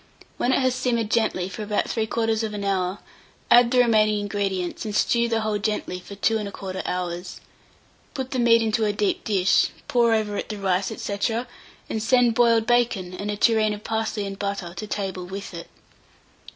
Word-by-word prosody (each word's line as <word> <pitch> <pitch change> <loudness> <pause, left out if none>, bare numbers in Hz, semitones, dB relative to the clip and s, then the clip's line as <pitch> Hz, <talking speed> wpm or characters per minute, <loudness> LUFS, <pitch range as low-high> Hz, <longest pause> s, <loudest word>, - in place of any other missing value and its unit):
When 245 - +1
it - - +3
has 255 -1 +2
simmered 235 -4 -1
gently 200 -6 +1
for 190 +2 -7
about 210 0 0
3/4 220 -2 -1
hour, 190 -1 0 0.5
add 240 0 +7
the 255 - +1
remaining 215 -3 +4
ingredients, 195 -3 -2
and 210 -2 -4
stew 235 +1 +2
the 225 -1 +1
whole 215 -1 -1
gently 210 -3 -2
for 200 +2 -10
2 220 +3 +1
1/4 195 -2 -5
hours. 180 0 -4 0.8
Put 265 -1 -4
the 260 - -1
meat 230 -1 +5
into 220 0 0
a 210 -1 +1
deep 205 -1 0
dish, 195 -3 +3 0.2
pour 235 -2 +3
over 210 -2 -1
it - - -4
the 210 - -4
rice, 190 -1 0
&c., 210 -2 -4 0.7
and 220 - -3
send 240 +1 +3
boiled 230 -1 +4
bacon, 230 -7 +1
and 200 +3 -5
a 205 - -2
tureen 215 -1 +3
of 205 - -12
parsley 220 -2 -2
and 195 0 -6
butter 200 -4 -3
to 215 - -6
table 190 -3 -4
with 195 +1 -7
it. 170 0 -8
210 Hz, 180 wpm, -24 LUFS, 195-230 Hz, 0.8 s, add